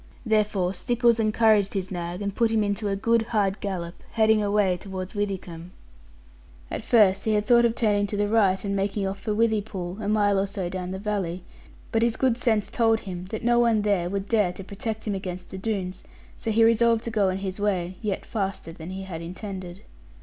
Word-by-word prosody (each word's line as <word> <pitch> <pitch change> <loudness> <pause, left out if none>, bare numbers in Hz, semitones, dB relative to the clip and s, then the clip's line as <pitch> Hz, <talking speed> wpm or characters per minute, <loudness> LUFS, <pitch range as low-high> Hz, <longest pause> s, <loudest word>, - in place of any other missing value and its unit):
Therefore 210 -4 +1
Stickles 235 +3 +2
encouraged 215 -2 +3
his 190 -1 -2
nag, 175 +1 -4
and 200 -1 -2
put 230 +2 +2
him 220 -1 +2
into 205 +1 -1
a 200 - 0
good 230 +3 +2
hard 210 -3 0
gallop, 175 -4 -4 0.2
heading 220 -1 +4
away 200 -2 +2
towards 190 0 -6
Withycombe. 185 -5 -4 1.0
At - - -3
first 200 -4 +4
he 220 -1 +2
had 210 0 +1
thought 235 +1 +5
of 230 -1 +1
turning 205 -3 +2
to 205 - -4
the 205 0 +1
right, 205 -3 +2
and 200 0 -1
making 195 +1 -1
off 195 +1 -3
for 210 +1 -2
Withypool, 210 -4 -1
a 205 - -2
mile 205 -2 +3
or 195 - 0
so 195 -2 -4
down 180 0 -4
the 190 - -4
valley; 190 -4 -3 0.5
but 225 - +2
his 235 -1 +1
good 260 -3 +2
sense 225 -4 0
told 225 -2 +2
him 180 -2 -6
that 215 +4 -6
no 240 0 +4
one 230 -3 +3
there 195 -4 +1
would 195 +1 -3
dare 210 -5 +2
to 195 - -8
protect 215 +3 -5
him 210 - -1
against 185 -2 -6
the 190 - -6
Doones, 190 -3 -3 0.3
so - - -5
he 225 +1 +4
resolved 230 0 +4
to 230 - -4
go 205 -3 +2
on 185 - -1
his 195 0 -5
way; 185 -3 -1
yet 210 -3 -2
faster 195 -5 -3
than 165 +1 -9
he 190 +1 -5
had 175 -4 -6
intended. 185 +1 -7
205 Hz, 210 wpm, -25 LUFS, 190-220 Hz, 1.0 s, thought